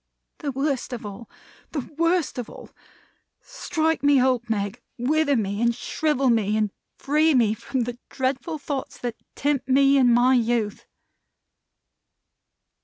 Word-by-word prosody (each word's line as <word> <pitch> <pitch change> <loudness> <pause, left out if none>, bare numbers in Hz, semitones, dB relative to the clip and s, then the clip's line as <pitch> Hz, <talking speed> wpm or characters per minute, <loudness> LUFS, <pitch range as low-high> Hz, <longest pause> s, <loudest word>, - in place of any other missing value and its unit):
"The 290 -3 -3
worst 270 -1 -2
of 235 -2 -6
all! 205 +3 -8 0.4
The 285 -6 -3
worst 335 -3 +1
of 240 - -5
all! - - -12 0.7
Strike 320 -10 -2
me 285 -1 +5
old, 250 -2 +1
Meg! 205 +2 -2 0.2
Wither 285 +3 +2
me 205 -2 -1
and 235 0 +2
shrivel 275 0 0
me, 215 -2 +1
and 215 -2 0 0.3
free 305 +2 +2
me 225 -4 +3
from 255 +4 -3
the 240 0 -4
dreadful 270 +4 -2
thoughts 280 -2 -5
that 240 -2 -4 0.2
tempt 280 -2 -1
me 275 +1 +5
in 250 -3 +5
my 245 +2 +5
youth!" 230 -4 0
255 Hz, 140 wpm, -24 LUFS, 235-285 Hz, 0.7 s, me